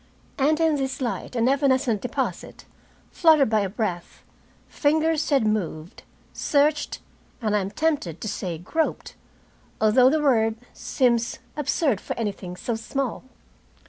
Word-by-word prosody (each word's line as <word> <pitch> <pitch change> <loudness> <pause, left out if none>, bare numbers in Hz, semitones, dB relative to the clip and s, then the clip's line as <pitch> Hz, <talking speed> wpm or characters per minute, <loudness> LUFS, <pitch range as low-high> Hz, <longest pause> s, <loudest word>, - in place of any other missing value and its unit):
And 305 +3 +3
in 320 -2 +3
this 265 -1 -3
light 250 0 -4
and 235 0 +2
evanescent 260 -5 +2
deposit, 250 - -4 0.5
fluttered 310 -8 +4
by 215 - +3
a 200 -2 -1
breath, 185 -5 -4 0.4
fingers 315 +1 +1
had 275 -6 +3
moved, 180 -6 -2 0.3
searched, 295 +1 +1 0.4
I 215 -3 0
am 195 -2 0
tempted 285 - -1
to - - -5
say 185 -5 -3
groped, 315 - -2 0.7
although 245 +4 +5
the 310 +3 +2
word 225 -7 +2 0.2
seems 235 -3 0 0.2
absurd 285 - 0
for - - -5
anything 200 -5 -4
so 235 - -3
small. 255 +3 -3
250 Hz, 130 wpm, -24 LUFS, 215-290 Hz, 0.7 s, although